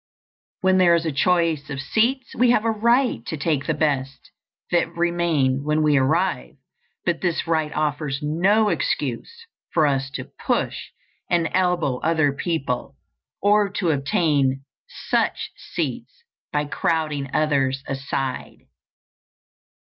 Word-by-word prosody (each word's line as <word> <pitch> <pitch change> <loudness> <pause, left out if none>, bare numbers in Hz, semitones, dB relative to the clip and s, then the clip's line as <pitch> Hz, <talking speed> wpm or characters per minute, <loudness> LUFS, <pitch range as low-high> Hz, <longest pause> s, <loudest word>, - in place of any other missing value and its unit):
When 190 0 +3
there 175 -2 +6
is 170 0 -1
a 160 - 0
choice 165 0 +1
of 135 -2 -4
seats 235 - 0
we 245 +1 +3
have 230 -2 +3
a 225 - +3
right 235 - +2
to 160 - -3
take 145 -2 -1
the 165 - +1
best 135 -4 -2 0.4
that 170 -1 +2
remain 170 -6 +1
when 150 +1 +1
we 150 -1 +3
arrive; 130 - +1 0.5
but 170 -2 0
this 175 -3 0
right 160 -2 0
offers 150 -2 -1
no 195 +8 +2
excuse 465 - -2 0.3
for 160 -2 +3
us 135 -2 0
to - - -4 0.2
push - - -1 0.4
and 170 -2 +1
elbow 175 -8 +1
other 155 -3 +2
people, 140 - -3 0.5
or 205 0 +4
to 175 -5 +1
obtain 140 -2 +1 0.2
such - - -1
seats 470 - -5 0.3
by 150 0 0
crowding 150 -2 -1
others 135 -3 +1
aside. 135 -1 -4
155 Hz, 130 wpm, -23 LUFS, 140-180 Hz, 0.5 s, there